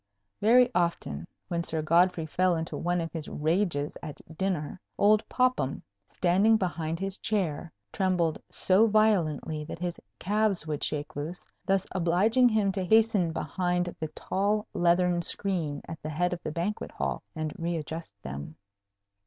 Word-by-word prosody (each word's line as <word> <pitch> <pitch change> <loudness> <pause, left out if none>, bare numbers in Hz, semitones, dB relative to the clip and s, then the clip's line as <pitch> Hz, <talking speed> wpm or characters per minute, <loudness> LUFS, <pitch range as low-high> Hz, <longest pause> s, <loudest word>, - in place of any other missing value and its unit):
Very 245 +4 +6
often, 170 - -1 0.2
when 170 -1 -1
Sir 160 -2 -1
Godfrey 170 +1 +3
fell 180 +3 +2
into 160 0 -3
one 175 +1 0
of 165 - -4
his 160 -3 -5
rages 155 -2 0
at 150 -2 -7 0.2
dinner, 185 -1 -2 0.2
old 210 +1 +5
Popham, 255 - +1 0.3
standing 195 +5 +4
behind 170 -4 -2
his 195 +1 -2
chair, 175 -7 -1 0.2
trembled 180 -4 +1
so 195 +4 +4
violently 170 -8 +2
that 165 - -6
his 175 0 -4 0.2
calves 205 -3 +1
would 150 -2 -3
shake 150 0 -2
loose, 155 +5 -5 0.2
thus 195 -1 +2
obliging 195 +8 +3
him 215 -3 +2
to 190 -1 -2
hasten 215 -3 +3
behind 175 +3 -1
the 160 - -2
tall 205 +3 0
leathern 175 0 +3
screen 170 -5 -2
at 160 -1 -7
the 155 - -5
head 175 +4 0
of 175 - -5
the - - -4
banquet 175 +7 -3
hall - - -2
and 155 -1 -3
readjust 165 -8 -4
them. 70 +3 -6
175 Hz, 150 wpm, -28 LUFS, 160-195 Hz, 0.3 s, Very